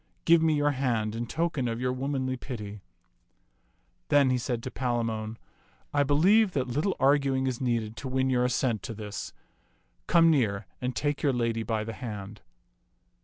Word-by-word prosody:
Give 165 Hz, 0 st, +6 dB
me 160 Hz, -1 st, +3 dB
your 145 Hz, 0 st, +2 dB
hand 120 Hz, -6 st, -1 dB
in 115 Hz, +1 st, -4 dB
token 160 Hz, -5 st, -1 dB
of 115 Hz, 0 st, -2 dB
your 125 Hz, 0 st, 0 dB
womanly 130 Hz, 0 st, -2 dB
pity." 105 Hz, -6 st, -7 dB, 1.3 s
Then 140 Hz, -3 st, +4 dB
said 120 Hz, 0 st, -2 dB
he -, -, -10 dB
to 130 Hz, -, -6 dB
Palamon, 115 Hz, -3 st, -2 dB, 0.3 s
" -, -, -35 dB
I 145 Hz, -, +3 dB
believe 185 Hz, +9 st, +4 dB
that 130 Hz, -3 st, 0 dB
little 150 Hz, +11 st, 0 dB
52 -, -, -17 dB
ti^^Mms^f^tak 135 Hz, -, 0 dB
arguing 135 Hz, -1 st, +3 dB
is 130 Hz, -2 st, -2 dB
needed 115 Hz, -3 st, -1 dB
to 115 Hz, -, -6 dB
win 130 Hz, 0 st, +1 dB
your 125 Hz, -1 st, +2 dB
assent 125 Hz, -3 st, 0 dB
to 115 Hz, -, -6 dB
this. 105 Hz, -2 st, -6 dB, 0.8 s
Come 165 Hz, -1 st, +5 dB
near 110 Hz, -8 st, +1 dB, 0.2 s
and 125 Hz, 0 st, -2 dB
take 145 Hz, -1 st, -1 dB
your 140 Hz, -3 st, +2 dB
lady 115 Hz, -2 st, 0 dB
by 110 Hz, -1 st, -1 dB
the 115 Hz, +1 st, -5 dB
hand." 105 Hz, -4 st, -7 dB
125 Hz, 180 wpm, -28 LUFS, 115-140 Hz, 1.3 s, Give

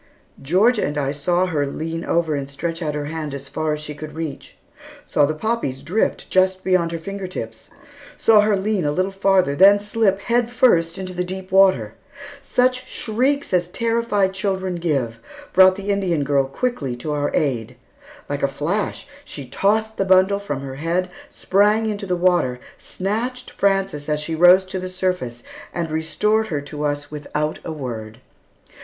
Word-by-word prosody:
Georgia 200 Hz, -, +3 dB
and 145 Hz, +1 st, -2 dB
I 140 Hz, -1 st, 0 dB
saw 175 Hz, +5 st, +1 dB
her 150 Hz, -6 st, -1 dB
lean 165 Hz, +3 st, -4 dB
over 165 Hz, -2 st, 0 dB
and 140 Hz, -1 st, -3 dB
stretch 165 Hz, +4 st, -4 dB
out 150 Hz, -2 st, -2 dB
her 145 Hz, -1 st, -3 dB
hand 155 Hz, -2 st, -4 dB
as 140 Hz, 0 st, -8 dB
far 155 Hz, +2 st, -2 dB
as 150 Hz, -, -4 dB
she 150 Hz, 0 st, -6 dB
could 150 Hz, +1 st, -9 dB
reach; 160 Hz, -4 st, -6 dB, 0.5 s
saw 145 Hz, -, +2 dB
the 155 Hz, -, -2 dB
poppies 155 Hz, -, -2 dB
drift 185 Hz, +9 st, -1 dB
just 185 Hz, 0 st, +2 dB
beyond 180 Hz, -3 st, +2 dB
her 165 Hz, -, -3 dB
finger 195 Hz, +3 st, -6 dB
tips; 115 Hz, -10 st, -7 dB, 0.5 s
saw 220 Hz, -2 st, +5 dB
her 210 Hz, 0 st, +2 dB
lean 200 Hz, -1 st, 0 dB
a 145 Hz, -, +1 dB
little 185 Hz, +5 st, 0 dB
farther, 195 Hz, -6 st, +2 dB
then 200 Hz, +5 st, +7 dB
slip, 205 Hz, -1 st, +1 dB
head 240 Hz, +1 st, +1 dB
first, 185 Hz, -9 st, +3 dB
into 185 Hz, -1 st, -5 dB
the 180 Hz, 0 st, -1 dB
deep 185 Hz, +1 st, -7 dB
water. 185 Hz, -, +4 dB, 0.5 s
Such 255 Hz, -1 st, +1 dB
shrieks 260 Hz, +4 st, -1 dB
as 175 Hz, -1 st, +2 dB
terrified 230 Hz, -3 st, 0 dB
children 190 Hz, -2 st, -2 dB
give, 135 Hz, -9 st, -1 dB, 0.3 s
brought 185 Hz, 0 st, +7 dB
the 200 Hz, +1 st, -3 dB
Indian 180 Hz, -7 st, 0 dB
girl 140 Hz, -1 st, +2 dB
quickly 140 Hz, -, -2 dB
to 120 Hz, +5 st, -5 dB
our 145 Hz, 0 st, 0 dB
aid. 125 Hz, -4 st, -1 dB, 0.5 s
Like 145 Hz, 0 st, -3 dB
a -, -, +3 dB
flash, 165 Hz, +9 st, -2 dB, 0.2 s
she 145 Hz, -, -8 dB
tossed 215 Hz, -, 0 dB
the -, -, +1 dB
bundle 190 Hz, +1 st, +4 dB
from 145 Hz, -9 st, -4 dB
her 135 Hz, -1 st, -7 dB
head, 175 Hz, +4 st, -1 dB, 0.2 s
sprang 210 Hz, +3 st, +2 dB
into 205 Hz, -2 st, -3 dB
the 180 Hz, -, +1 dB
water, 175 Hz, -9 st, +2 dB, 0.2 s
snatched 235 Hz, +6 st, -4 dB
Frances 195 Hz, -7 st, 0 dB
as 150 Hz, 0 st, +1 dB
she 150 Hz, +2 st, -4 dB
rose 180 Hz, +3 st, +6 dB
to 185 Hz, 0 st, -4 dB
the 185 Hz, 0 st, -5 dB
surface, 180 Hz, -11 st, -3 dB, 0.3 s
and 170 Hz, -2 st, -3 dB
restored 210 Hz, +8 st, +1 dB
her 150 Hz, -7 st, -2 dB
to 150 Hz, +1 st, -5 dB
us 145 Hz, 0 st, -3 dB
without 150 Hz, +1 st, -3 dB
a -, -, -5 dB
word. 115 Hz, -6 st, -6 dB
180 Hz, 175 wpm, -21 LUFS, 145-200 Hz, 0.5 s, then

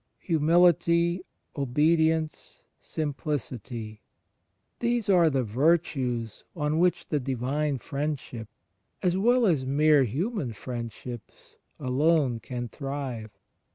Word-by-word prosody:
HumiUty, 170 Hz, +1 st, +3 dB, 0.3 s
obedience, 155 Hz, +3 st, +1 dB, 0.2 s
simplicity 125 Hz, -, -4 dB, 0.4 s
— 90 Hz, +2 st, -49 dB
these 235 Hz, -2 st, 0 dB
are 175 Hz, -4 st, +5 dB
the 135 Hz, -3 st, +1 dB
virtues 125 Hz, -3 st, 0 dB
on 150 Hz, -1 st, 0 dB
which 180 Hz, 0 st, +1 dB
the 150 Hz, -, +1 dB
Divine 135 Hz, +3 st, -1 dB
Friendship, 140 Hz, -5 st, -4 dB, 0.6 s
as 180 Hz, -1 st, +2 dB
well 240 Hz, +5 st, +3 dB
as 160 Hz, -9 st, +2 dB
mere 145 Hz, +2 st, +4 dB
human 150 Hz, -, -2 dB
friendships, 120 Hz, +1 st, -8 dB, 0.2 s
alone 140 Hz, -1 st, +2 dB
can 120 Hz, +2 st, -5 dB
thrive. 135 Hz, -5 st, -5 dB
145 Hz, 95 wpm, -27 LUFS, 125-165 Hz, 0.6 s, are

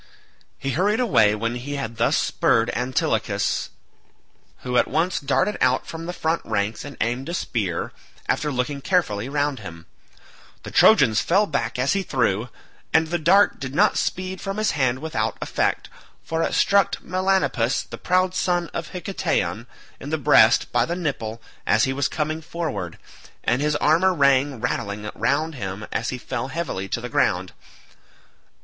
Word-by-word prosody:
He 135 Hz, -, -3 dB
hurried 200 Hz, -, +1 dB
away 110 Hz, -, +4 dB
when 115 Hz, +2 st, -2 dB
he 130 Hz, +4 st, -5 dB
had 115 Hz, -5 st, -5 dB
thus 115 Hz, -, +2 dB
spurred 115 Hz, +1 st, +2 dB
Antilochus, 125 Hz, +1 st, -1 dB, 0.9 s
who 125 Hz, -1 st, -3 dB
at -, -, +4 dB
once 170 Hz, +4 st, 0 dB
darted 210 Hz, +8 st, 0 dB
out 130 Hz, 0 st, +2 dB
from 165 Hz, 0 st, -7 dB
the -, -, -2 dB
front 165 Hz, -1 st, -1 dB
ranks 100 Hz, +2 st, -2 dB
and 145 Hz, -1 st, -9 dB
aimed 120 Hz, +6 st, -2 dB
a 175 Hz, -, -2 dB
spear, 100 Hz, -, -2 dB, 0.3 s
after 150 Hz, -1 st, 0 dB
looking 140 Hz, +2 st, -2 dB
carefully 130 Hz, -, 0 dB
round 145 Hz, -2 st, -1 dB
him. 85 Hz, -5 st, -10 dB, 0.8 s
The -, -, -8 dB
Trojans 110 Hz, 0 st, +5 dB
fell 195 Hz, +5 st, +3 dB
back 130 Hz, -, -2 dB
as 130 Hz, +2 st, +1 dB
he 195 Hz, -, 0 dB
threw, 120 Hz, -, 0 dB, 0.4 s
and 160 Hz, 0 st, +3 dB
the 175 Hz, +1 st, -1 dB
dart 190 Hz, +6 st, +4 dB
did 135 Hz, 0 st, -6 dB
not 205 Hz, +5 st, +4 dB
speed 185 Hz, 0 st, -2 dB
from 195 Hz, +1 st, -4 dB
his 215 Hz, 0 st, +1 dB
hand 130 Hz, -4 st, +1 dB
without 160 Hz, 0 st, -2 dB
effect, -, -, -1 dB, 0.4 s
for 165 Hz, 0 st, -2 dB
it -, -, 0 dB
struck 200 Hz, 0 st, +3 dB
Melanippus 185 Hz, -9 st, +1 dB
the -, -, -10 dB
proud 185 Hz, 0 st, +1 dB
son 175 Hz, -2 st, 0 dB
of 170 Hz, -, -4 dB
Hiketaon 175 Hz, -, -2 dB, 0.3 s
in 140 Hz, -, -7 dB
the 160 Hz, -, 0 dB
breast 145 Hz, -, +5 dB
by -, -, +3 dB
the 170 Hz, -, -2 dB
nipple 115 Hz, -10 st, -4 dB, 0.2 s
as 110 Hz, +1 st, +4 dB
he 135 Hz, -, +1 dB
was 140 Hz, 0 st, 0 dB
coming 155 Hz, +1 st, -2 dB
forward, 155 Hz, -, -4 dB, 0.5 s
and 120 Hz, +4 st, +1 dB
his 150 Hz, 0 st, +1 dB
armour 175 Hz, +6 st, +3 dB
rang 140 Hz, -2 st, +3 dB
rattling 105 Hz, 0 st, -3 dB
round 140 Hz, +8 st, 0 dB
him 100 Hz, -5 st, -5 dB
as 115 Hz, -, -2 dB
he 130 Hz, -, -3 dB
fell 125 Hz, 0 st, -4 dB
heavily 130 Hz, -, -4 dB
to 120 Hz, -, -2 dB
the 125 Hz, -, -4 dB
ground. 95 Hz, -5 st, 0 dB
140 Hz, 165 wpm, -23 LUFS, 115-170 Hz, 0.9 s, Trojans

